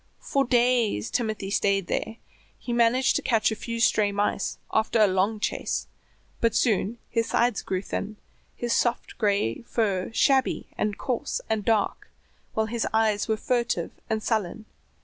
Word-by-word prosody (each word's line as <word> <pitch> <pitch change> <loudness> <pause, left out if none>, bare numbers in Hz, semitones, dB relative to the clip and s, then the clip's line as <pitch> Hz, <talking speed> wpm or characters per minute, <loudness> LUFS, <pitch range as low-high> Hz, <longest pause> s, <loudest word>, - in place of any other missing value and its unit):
For 275 -1 0
days 240 - +2
Timothy 215 -4 -2
stayed 200 -2 +2
there; 220 +5 -2 0.4
he 240 - -5
managed 240 +2 +3
to - - -2
catch 225 -2 +2
a - - -1
few 230 +1 -5
stray 210 -2 +3
mice 205 0 -1 0.2
after 220 +1 +2
a 215 - +7
long 195 +3 +1
chase, - - -2 0.5
but 230 -2 +1
soon 220 0 +1
his 230 -1 0
sides 235 -3 +2
grew 185 0 -3
thin, 210 +2 -4 0.4
his 240 -1 -1
soft 240 -1 0
gray 200 - +1
fur 200 -6 -1
shabby 265 +3 +2
and 210 -1 -1
coarse 250 -4 -2
and 220 -2 0
dark, 215 -1 0 0.5
while 220 - +2
his 230 +1 -2
eyes 220 -2 +2
were 220 -1 +1
furtive 240 +1 -1 0.2
and 220 -1 -1
sullen. 215 -1 -1
220 Hz, 155 wpm, -26 LUFS, 205-235 Hz, 0.5 s, a